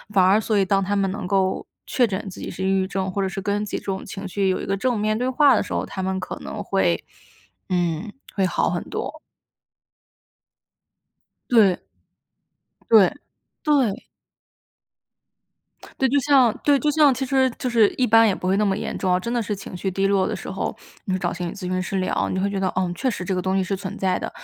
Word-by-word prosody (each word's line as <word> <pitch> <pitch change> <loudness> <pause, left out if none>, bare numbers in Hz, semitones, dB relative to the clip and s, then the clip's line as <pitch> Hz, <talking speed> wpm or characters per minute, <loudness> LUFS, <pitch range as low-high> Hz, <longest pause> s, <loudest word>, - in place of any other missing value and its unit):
反 185 -2 +6
而 200 +4 +4
所 215 -1 0
以 195 - +3
当 195 +1 +2
他 205 +2 -1
们 195 -1 +1
能 200 -2 -5
够 190 -1 0 0.2
确 245 -3 +2
诊 195 +1 -4
自 190 - -8
己 - - -6
是 190 - -5
抑 - - +2
郁 190 -1 +1
症， 190 -1 -2
或 200 - -2
者 190 - 0
是 195 - -5
跟 205 +1 -1
自 210 - -6
己 - - -1
这 - - -9
种 190 -1 -3
情 195 +1 -7
绪 195 +1 0
有 185 - 0
一 - - -5
个 195 - 0
正 240 +3 0
面 215 +1 +1
对 250 +3 -1
话 280 +2 +5
的 - - +2
时 - - -7
候， - - -1
他 190 - -6
们 190 0 -1
可 185 - -6
能 - - -6
会 - - 0 0.6
嗯， 175 +2 -1 0.2
会 190 -2 +2
好 175 - 0
很 175 - -2
多。 315 - -5 2.3
对。 210 -7 +5 1.1
对， 215 -1 +7 0.5
对。 270 -9 +1 1.9
对， 265 - +4
就 285 0 +3
像 265 -5 +4
对， 285 -1 +4
就 300 - +1
像 295 -2 +5
其 265 +2 -2
实 265 0 +3
就 250 - -2
是 225 -3 +5
一 255 - +2
般 225 +1 +6
也 195 - +2
不 185 - -6
会 190 +1 +2
那 210 - +2
么 195 -1 +1
严 - - -4
重， 180 -1 +2
真 235 +6 -4
的 240 - +1
是 210 -1 -3
情 195 - -9
绪 190 +2 -2
低 195 +1 0
落 195 -1 +2
的 - - -3
时 - - -7
候， - - -3 0.3
你 190 - -1
会 185 - 0
找 175 -1 -1
心 175 0 -4
理 - - -6
咨 205 - -10
询 185 0 -2
师 195 +2 -3
聊， 185 - 0
你 185 - -2
会 200 +2 0
觉 195 -1 -2
得， 190 - +1
嗯， 180 -2 0
确 260 +7 -1
实 185 -4 -5
这 190 - -1
个 180 - 0
东 190 +1 0
西 190 - +1
是 195 +1 -2
存 195 +1 -6
在 185 -1 0
的。 - - -5
195 Hz, 255 characters per minute, -23 LUFS, 185-225 Hz, 2.3 s, 对